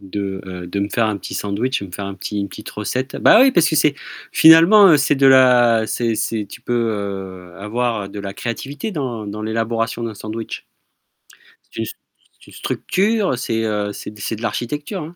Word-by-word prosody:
de, 95 0 -5
heu, 90 -1 -7
de 100 - -3
me 100 - -1
faire 115 +1 +1
un 105 -2 -1
petit - - -8
sandwich 105 +4 -2
et - - -6
me - - -15
faire 100 +3 -6
un 100 - -6
petit 105 +2 -5
une 100 -1 -2
petite - - -10
recette. 125 +6 -4
Bah 220 - +6
oui, 265 +1 +6
parce 175 -9 +3
que - - -1
c'est 145 -1 +2 0.3
finalement, 165 +3 +7
c'est 140 0 +1
de 135 0 +4
la 120 -4 +5
c'est 115 -2 -1
c'est 110 -1 -2
tu - - -11
peux, - - -5 0.8
heu, - - -15
avoir 110 0 -2
de 100 +1 -8
la 100 -1 -6
créativité 135 - -5
dans 125 - -4
dans 105 +1 -6
l'élaboration 115 +1 -2
d'un 115 -2 -5
sandwich. 110 +2 -7 1.0
C'est - - -8
une - - -2
c'est - - -15
une - - -15
structure, 200 - -1
c'est, 115 -2 -2
heu, 105 -1 -2
c'est 105 - -9
c'est 110 - -3
de 110 - -11
l'architecture, 150 - -4
hein. 165 +3 -10
115 Hz, 200 wpm, -19 LUFS, 105-140 Hz, 1.0 s, finalement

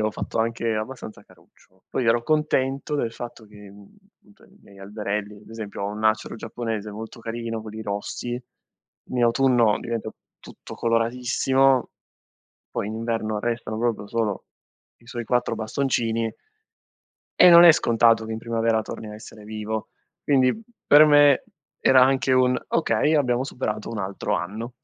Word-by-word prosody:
avo 110 0 +1
fatto - - -5
anche 115 0 0
abbastanza 110 0 -6
caruccio. 95 0 -25
Poi 130 - -2
ero 115 +1 +3
contento 145 -1 0
del 115 -6 -1
fatto 120 -2 -9
che, 105 -1 -14
mhmm, 100 0 -16 0.5
cioè, - - -22
i - - -23
miei 100 -1 -18
alberelli, 105 +1 -4
ad - - -18
esempio, 110 -3 -7
ho 100 - -1
un 105 +1 -6
acero 110 +1 +1
giapponese 110 -2 -5
molto 110 +2 -9
carino, 115 -1 -5
quelli 110 0 -8
rossi, 110 +4 -4 0.7
in 125 -1 0
autunno 120 -2 +3
diventa 115 -2 -4 0.3
tutto - - -12
coloratissimo, 125 +3 +1 0.8
poi - - -3
in 110 - -5
inverno 115 -1 -2
restano 115 -1 -3
proprio 115 -3 -1
solo 110 -3 -2 0.5
i 120 - -24
suoi 120 -1 -6
4 125 +1 0
bastoncini 115 -1 -1 1.1
e 180 - +9
non 170 0 +9
è 170 - +11
scontato 115 -5 +3
che 110 - -6
in 110 - -4
primavera 115 -1 0
torni 110 - -8
a - - -9
essere 105 0 -12
vivo. 110 0 -5 0.3
Quindi, 135 - +2 0.3
per 150 +1 +8
me 145 - +5 0.4
era 130 -1 +6
anche 130 0 +2
un: 125 0 +3
"Okay, 160 -1 +1
abbiamo 125 -4 +1
superato 115 -6 -4
un 115 - -4
altro 95 0 -3
anno". 110 +8 -4
115 Hz, 155 wpm, -24 LUFS, 110-125 Hz, 1.1 s, è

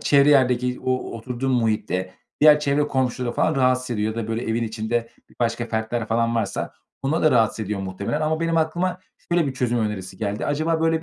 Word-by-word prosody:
çevre 140 0 +5
yerdeki 125 -2 +3
o 130 0 +2 0.2
oturduğun 125 +3 -3
muhitte 105 -6 0 0.3
diğer 150 0 +7
çevre 145 0 +1
komşuları 125 -2 -1
falan 155 +4 +1
rahatsız 130 -1 +2
ediyor 110 0 -1
ya 115 - -1
da, - - -9
böyle, 115 +2 -2
evin 115 +1 -1
içinde 115 +1 -2 0.3
başka 115 0 0
fertler 110 0 -2
falan 115 +1 +1
varsa 115 - -2 0.3
onları 150 +5 0
da 155 - +5
rahatsız 110 -2 +2
ediyor 100 0 -3
muhtemelen 95 +10 -3
ama 160 +1 0
benim 165 0 0
aklıma 175 +3 0 0.3
şöyle 170 -4 +3
bir 135 - -3
çözüm 120 -2 0
önerisi 100 -4 -3
geldi. 105 -1 -2
Acaba 160 +3 0
böyle 160 0 +1
120 Hz, 190 wpm, -23 LUFS, 110-145 Hz, 0.3 s, diğer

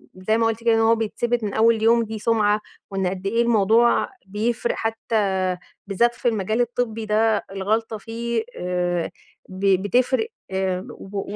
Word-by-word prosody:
زي 215 +4 0
ما 230 - +2
قُلتِ 225 0 -3
كده، 230 -1 +4
إن 225 - +2
هو 225 +1 +4
بيثِبت 230 +1 -1
من 205 - -2
أول 225 0 +3
يوم، 230 +1 +5
دي 220 0 -6
سُمعَة. 210 -1 +2 0.3
وإن 195 -1 -1
قد 190 +1 -3
إيه 230 +3 +2
الموضوع 230 0 +3 0.2
بيفرق 220 +4 -1
حتّى 200 -5 -1 0.3
بالذات 235 +5 +2
في - - -2
المجال 220 +1 +1
الطبّي 230 -2 -2
ده 215 0 +2
الغلطة 215 +3 -1
فيه 230 +1 -3
آآ 180 -1 -1 0.4
ب 190 0 +2
بتفرق، 255 - +1 0.6
و 200 +1 -6
220 Hz, 155 wpm, -23 LUFS, 195-230 Hz, 0.6 s, يوم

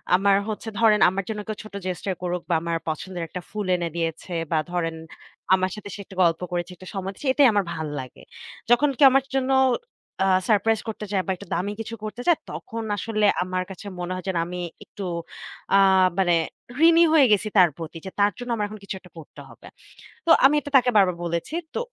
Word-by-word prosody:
আমার 195 +1 +4
হচ্ছে 215 +1 -5
ধরেন 215 -2 +5
আমার 190 +1 -3
জন্য 215 -1 -3
কেউ 215 - -4
ছোট 215 -1 -13
Gesture 185 +1 -3
করুক 180 0 -2
বা - - +2
আমার 170 0 -1
পছন্দের 175 +3 -5
১ - - -35
টা - - -4
ফুল 210 -2 -3
এনে 170 -1 -2
দিয়েছে 165 +1 -3 0.2
বা 160 - +2
ধরেন 165 -2 -1 0.6
আমার 185 0 +2
সাথে 210 -1 -9
সে - - -8
একটা 190 - -14
গল্প 165 -1 +2
করেছে 175 0 -3
একটা 185 - -13
সময় 195 0 -3
দিয়েছে। 280 - -7
এটাই 280 -1 +6
আমার 205 -1 +2
ভাল 160 -1 -4
লাগে। 130 -2 -10 0.5
যখন 265 +5 +5
কেউ 280 - +8
আমার 270 0 +3
জন্য 265 0 +1 0.7
আ - - +2 0.2
সারপ্রাইজ 220 +1 +3
করতে 215 -1 -5
চায় 190 -2 +1
বা - - +1
একটু 180 - -12
দামি 185 +4 -1
কিছু 230 +1 -6
করতে 215 +3 -5
চায়, 340 - +5
তখন 230 0 -6
আসলে 215 -1 0 0.2
আমার 185 0 -2
কাছে 190 +2 -10
মনে 175 +1 -4
হয় 185 - -6
যে - - +1
আমি 180 +1 -6 0.3
একটু 200 - -9 0.7
আ - - +7 0.4
মানে 180 -3 +3 0.5
ঋণী 335 0 +6
হয়ে 295 -4 +7
গেছি 210 +1 +3
তার 180 -2 +7
প্রতি। 165 0 -7
যে - - -4
তার 205 +1 +4
জন্য 245 0 -7
আমার 210 -2 -1
এখন 215 +1 -10
কিছু 200 - -5
একটা 180 -2 -18
করতে 160 - -12
হবে। - - -15 0.6
তো - - -2 0.2
আমি 285 +2 +6
এটা 290 - -9
তাকে 250 -1 +3
বারবার 185 -3 +4
বলেছি। 170 - -3 0.2
তো - - 0
195 Hz, 215 wpm, -24 LUFS, 175-220 Hz, 0.7 s, কেউ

